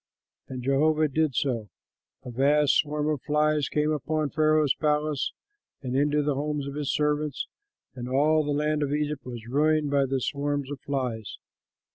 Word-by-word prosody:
'" - - -63
And 130 -1 -6
Jehovah 155 +4 +3
did 150 -1 0
so: 115 -6 -1 0.6
a 125 - -6
vast 140 +3 +3
swarm 150 0 0
of 150 -4 -1
flies 150 -1 +1
came 150 0 +1
upon 155 0 -1
Pharaoh's 155 -1 +3
palace 150 -2 0 0.5
and 130 -1 -3
into 145 +2 +2
the 145 0 +1
homes 145 +1 -2
of 140 - -5
his 145 -1 -2
servants; 150 -1 0 0.5
and 125 -1 -6
all 155 +4 +3
the 145 - -4
land 150 +1 0
of 145 -1 0
Egypt 150 -1 -2
was 120 -3 -8
ruined 150 +3 +2
by 140 -1 +3
the 135 0 0
swarms 145 +1 -2
of 145 - -5
flies. 125 -7 -3
145 Hz, 170 wpm, -26 LUFS, 135-150 Hz, 0.6 s, Jehovah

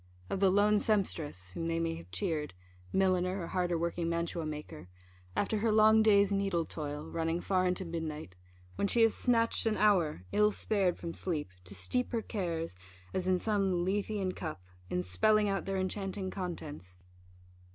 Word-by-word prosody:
of - - -1
the 195 -1 +5
lone 205 +2 +4
sempstress, 160 - -1
whom 165 - -3
they 165 0 0
may 165 0 0
have 85 - -9
cheered 150 - -2 0.4
(milliner, 185 0 +2
or 170 - -3
harder 175 -1 0
working 170 0 -1
mantua 170 -1 -2
maker) 150 - -7 0.5
after 210 +1 0
her 225 +1 +2
long 220 +1 +6
day's 205 -2 +5
needle 195 -4 +1
toil, 150 -2 -5
running 165 +1 -1
far 185 0 +1
into 180 +1 -1
midnight, 155 - -5 0.4
when 200 - +1
she 230 +3 +3
has 225 - +5
snatched 230 -2 +2
an 215 - +1
hour, 175 - +3
ill 210 0 +4
spared 200 -4 0
from 170 -1 -5
sleep, 155 - -3
to 95 +2 -6
steep 170 - -1
her 230 -2 0
cares, 165 - -3 0.4
as 185 -1 -1
in 185 -1 +4
some 195 -4 +1
Lethean 200 0 -1
cup, 155 - -6 0.3
in 90 - -1
spelling 205 - +3
out 195 -1 -1
their 195 0 -1
enchanting 190 0 -2
contents! 150 - -6
180 Hz, 170 wpm, -32 LUFS, 160-205 Hz, 0.5 s, long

